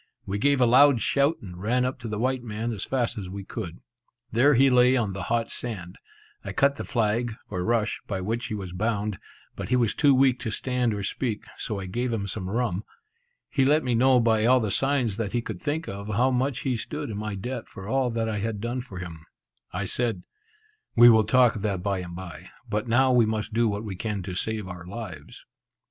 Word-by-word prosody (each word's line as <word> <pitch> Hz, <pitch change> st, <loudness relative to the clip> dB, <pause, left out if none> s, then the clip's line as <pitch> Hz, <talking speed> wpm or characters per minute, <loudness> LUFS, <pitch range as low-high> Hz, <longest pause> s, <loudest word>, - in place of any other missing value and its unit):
We 100 Hz, +1 st, -2 dB
gave 140 Hz, +3 st, +3 dB
a 125 Hz, -, +5 dB
loud 130 Hz, +2 st, +6 dB
shout, 140 Hz, +7 st, +2 dB
and 90 Hz, -2 st, -9 dB
ran 125 Hz, +5 st, +1 dB
up 130 Hz, 0 st, -3 dB
to 120 Hz, -, -6 dB
the 105 Hz, -1 st, -3 dB
white 130 Hz, +3 st, 0 dB
man 115 Hz, +1 st, -3 dB
as 100 Hz, -, -4 dB
fast 120 Hz, -4 st, -1 dB
as 95 Hz, -3 st, -6 dB
we 100 Hz, +1 st, -6 dB
could. 95 Hz, -4 st, -7 dB, 0.5 s
There 135 Hz, +5 st, +4 dB
he 135 Hz, +3 st, +6 dB
lay 125 Hz, 0 st, +5 dB
on 105 Hz, -5 st, 0 dB
the 95 Hz, -, -5 dB
hot 115 Hz, 0 st, 0 dB
sand. 95 Hz, -7 st, -6 dB, 0.4 s
I -, -, -5 dB
cut 140 Hz, 0 st, +3 dB
the -, -, -4 dB
flag, 115 Hz, -1 st, 0 dB, 0.2 s
or 90 Hz, -3 st, -2 dB
rush, 115 Hz, 0 st, 0 dB
by 95 Hz, -3 st, -2 dB
which 115 Hz, +6 st, -2 dB
he 110 Hz, -, -3 dB
was 95 Hz, -4 st, -6 dB
bound, 105 Hz, +1 st, -1 dB, 0.4 s
but -, -, -6 dB
he 125 Hz, -, +3 dB
was 120 Hz, -4 st, +2 dB
too 145 Hz, -3 st, +4 dB
weak 130 Hz, -1 st, +4 dB
to 120 Hz, -, -3 dB
stand 125 Hz, -1 st, -1 dB
or 100 Hz, -, -4 dB
speak, 110 Hz, +2 st, -2 dB
so 105 Hz, -3 st, -4 dB
I 95 Hz, -, -5 dB
gave 120 Hz, +7 st, -2 dB
him 110 Hz, -3 st, -1 dB
some 95 Hz, -1 st, -4 dB
rum. 110 Hz, -3 st, -1 dB, 0.6 s
He 135 Hz, -, +1 dB
let 150 Hz, +4 st, +4 dB
me 125 Hz, -, 0 dB
know 125 Hz, +2 st, +5 dB
by 110 Hz, -2 st, +3 dB
all 130 Hz, +1 st, +6 dB
the 110 Hz, -4 st, -1 dB
signs 130 Hz, -4 st, +1 dB
that 110 Hz, -3 st, -3 dB
he 120 Hz, -, +1 dB
could 105 Hz, -6 st, -6 dB
think 160 Hz, +3 st, -2 dB
of, 100 Hz, +1 st, -6 dB
how 120 Hz, +5 st, +2 dB
much 130 Hz, +2 st, 0 dB
he 130 Hz, -3 st, 0 dB
stood 145 Hz, +4 st, -5 dB
in 105 Hz, -, -5 dB
my 105 Hz, -1 st, -3 dB
debt 120 Hz, +4 st, -5 dB
for 95 Hz, -2 st, -10 dB
all 130 Hz, +1 st, +1 dB
that 115 Hz, -1 st, -1 dB
I 105 Hz, -2 st, -2 dB
had 110 Hz, 0 st, -2 dB
done 120 Hz, +3 st, -2 dB
for 110 Hz, -7 st, -10 dB
him. 85 Hz, -3 st, -7 dB, 0.5 s
I 100 Hz, +3 st, -3 dB
said, 115 Hz, -4 st, -1 dB, 0.7 s
"We 120 Hz, +1 st, +9 dB
will 110 Hz, -2 st, +5 dB
talk 125 Hz, +2 st, +4 dB
of 105 Hz, -, -5 dB
that 100 Hz, -4 st, -2 dB
bye 100 Hz, -2 st, 0 dB
and 85 Hz, -1 st, -7 dB
bye; 90 Hz, -1 st, -9 dB, 0.2 s
but 105 Hz, +3 st, -2 dB
now 130 Hz, +3 st, +4 dB
we 120 Hz, -3 st, +4 dB
must 110 Hz, 0 st, -2 dB
do 115 Hz, +1 st, +3 dB
what 105 Hz, 0 st, -2 dB
we 100 Hz, -4 st, -5 dB
can 105 Hz, 0 st, -3 dB
to 90 Hz, 0 st, -5 dB
save 105 Hz, +2 st, -3 dB
our 90 Hz, -1 st, -8 dB
lives." 90 Hz, -8 st, -8 dB
115 Hz, 230 wpm, -26 LUFS, 100-125 Hz, 0.7 s, We